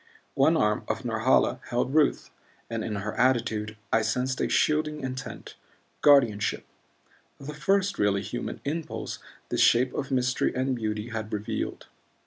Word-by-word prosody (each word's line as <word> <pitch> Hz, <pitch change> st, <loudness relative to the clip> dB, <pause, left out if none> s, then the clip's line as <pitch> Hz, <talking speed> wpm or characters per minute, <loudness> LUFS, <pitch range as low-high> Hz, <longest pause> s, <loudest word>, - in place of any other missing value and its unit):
One -, -, +4 dB
arm -, -, +1 dB
of -, -, -3 dB
Norhala -, -, +2 dB
held 125 Hz, +2 st, -1 dB
Ruth 155 Hz, -2 st, +2 dB, 0.4 s
and 115 Hz, -1 st, -2 dB
in 105 Hz, -, -3 dB
her 100 Hz, +1 st, -3 dB
attitude 110 Hz, -4 st, +1 dB, 0.2 s
I 110 Hz, -, +4 dB
sensed 125 Hz, +4 st, -1 dB
a -, -, 0 dB
shielding 150 Hz, 0 st, +1 dB
intent, 130 Hz, 0 st, -6 dB, 0.5 s
guardianship 120 Hz, -8 st, +4 dB, 0.7 s
the 140 Hz, +2 st, -7 dB
first 195 Hz, +5 st, +1 dB
really 100 Hz, -1 st, +2 dB
human -, -, -5 dB
impulse 160 Hz, +2 st, -4 dB, 0.3 s
this -, -, 0 dB
shape 125 Hz, +2 st, +4 dB
of 135 Hz, -, -3 dB
mystery 125 Hz, -1 st, 0 dB
and 130 Hz, 0 st, 0 dB
beauty 110 Hz, -1 st, -3 dB
had 110 Hz, -1 st, -5 dB
revealed. 105 Hz, 0 st, -3 dB
125 Hz, 140 wpm, -27 LUFS, 110-140 Hz, 0.7 s, One